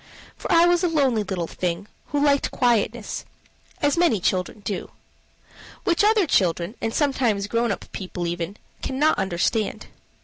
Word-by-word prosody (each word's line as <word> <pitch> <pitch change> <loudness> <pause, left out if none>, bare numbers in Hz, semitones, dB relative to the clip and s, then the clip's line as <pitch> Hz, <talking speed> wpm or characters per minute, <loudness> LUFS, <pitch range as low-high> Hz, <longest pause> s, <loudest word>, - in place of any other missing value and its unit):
For - - -5
I 335 0 +6
was 350 +1 +3
a - - +4
lonely 275 -9 +2
little 190 -4 -2
thing, 175 +2 -3 0.2
who 290 0 +1
liked 280 -1 +3
quietness 240 -2 0 0.6
as 290 +3 +3
many 300 - +3
children 185 +3 -1
do; 200 -1 -4 0.9
which 340 +2 +2
other 425 -2 +4
children, 180 - +1
and 225 - -1
sometimes 245 -7 +1
grown 230 +2 0
up - - -4
people 180 -2 -5
even, 175 +3 -3 0.2
cannot 290 +2 +1
understand. 195 +3 -1
225 Hz, 145 wpm, -24 LUFS, 190-290 Hz, 0.9 s, I